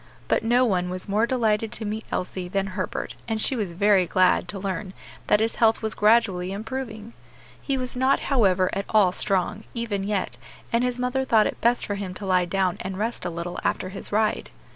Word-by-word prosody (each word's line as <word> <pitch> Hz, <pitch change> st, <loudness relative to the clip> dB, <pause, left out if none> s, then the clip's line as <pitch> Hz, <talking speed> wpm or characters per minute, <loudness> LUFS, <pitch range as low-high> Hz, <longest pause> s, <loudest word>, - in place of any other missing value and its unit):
But -, -, +1 dB
no 245 Hz, +3 st, +3 dB
one 180 Hz, -5 st, 0 dB
was 185 Hz, 0 st, -5 dB
more 210 Hz, +3 st, +2 dB
delighted 225 Hz, -3 st, +1 dB
to 220 Hz, -, -3 dB
meet 215 Hz, +1 st, -4 dB
Elsie 180 Hz, 0 st, -3 dB
than 195 Hz, +2 st, -1 dB
Herbert, 185 Hz, -1 st, -3 dB
and 225 Hz, -1 st, -1 dB
she 260 Hz, -, +2 dB
was 205 Hz, -7 st, -2 dB
very 195 Hz, 0 st, +3 dB
glad 185 Hz, +1 st, +3 dB
to 205 Hz, -, -6 dB
learn 190 Hz, 0 st, -4 dB, 0.3 s
that 210 Hz, -, +4 dB
his 225 Hz, +1 st, 0 dB
health 225 Hz, -1 st, +3 dB
was 220 Hz, -, 0 dB
gradually 210 Hz, -4 st, +3 dB
improving. 220 Hz, +1 st, -6 dB, 0.5 s
He 275 Hz, -2 st, -1 dB
was 255 Hz, -1 st, +1 dB
not, 260 Hz, +2 st, +2 dB
however, 190 Hz, -9 st, +2 dB
at 195 Hz, -, -2 dB
all 205 Hz, -4 st, +4 dB
strong, 195 Hz, +3 st, 0 dB
even 225 Hz, -4 st, -2 dB
yet, 200 Hz, -1 st, -2 dB, 0.4 s
and 235 Hz, +1 st, +3 dB
his 250 Hz, -1 st, 0 dB
mother 250 Hz, +1 st, 0 dB
thought 225 Hz, -4 st, +4 dB
it -, -, -3 dB
best 240 Hz, +1 st, +3 dB
for 205 Hz, -, -3 dB
him 195 Hz, -2 st, -5 dB
to 200 Hz, -, -6 dB
lie 185 Hz, -1 st, +3 dB
down 185 Hz, 0 st, 0 dB
and 190 Hz, 0 st, -5 dB
rest 225 Hz, -1 st, -3 dB
a -, -, 0 dB
little 170 Hz, +1 st, -5 dB
after 185 Hz, -, -1 dB
his 195 Hz, +1 st, -8 dB
ride. 215 Hz, +1 st, 0 dB
210 Hz, 205 wpm, -25 LUFS, 185-230 Hz, 0.5 s, that